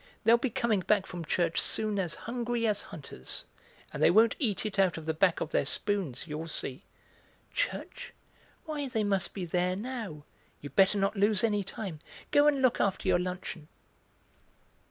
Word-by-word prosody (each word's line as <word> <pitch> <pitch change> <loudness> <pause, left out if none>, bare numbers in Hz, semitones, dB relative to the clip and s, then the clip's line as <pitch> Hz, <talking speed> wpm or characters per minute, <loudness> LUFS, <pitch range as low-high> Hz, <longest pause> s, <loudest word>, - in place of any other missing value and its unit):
They'll 230 +2 +6
be 265 - 0
coming 235 -3 +1
back 195 +1 +2
from 175 -3 -6
church 170 +1 +1
soon 215 -2 0
as 175 -4 -1
hungry 235 0 -1
as 210 -2 +1
hunters, 135 - -5 0.5
and - - -4
they - - +7
won't 220 +4 +5
eat 220 -6 0
it 205 -2 -3
out 185 -3 +3
of 160 - -7
the 160 - 0
back 175 +2 +2
of 155 - -3
their - - +2
spoons, 180 - -1
you'll 155 +1 -5
see." 155 0 -3 0.7
"Church! - - -3 0.5
why, 300 -3 -3
they 225 -4 -1
must 195 -2 0
be 190 -3 -3
there 180 +2 0
now; 215 - -5 0.4
you'd 145 - -10
better 195 +1 +5
not 195 +2 +1
lose 205 +1 +3
any 210 -3 +2
time. 185 -4 -6 0.3
Go 290 +1 +5
and 280 -3 +3
look 255 - +3
after 195 -1 0
your 180 -1 +4
luncheon." 180 -3 -5
195 Hz, 175 wpm, -30 LUFS, 175-225 Hz, 0.7 s, they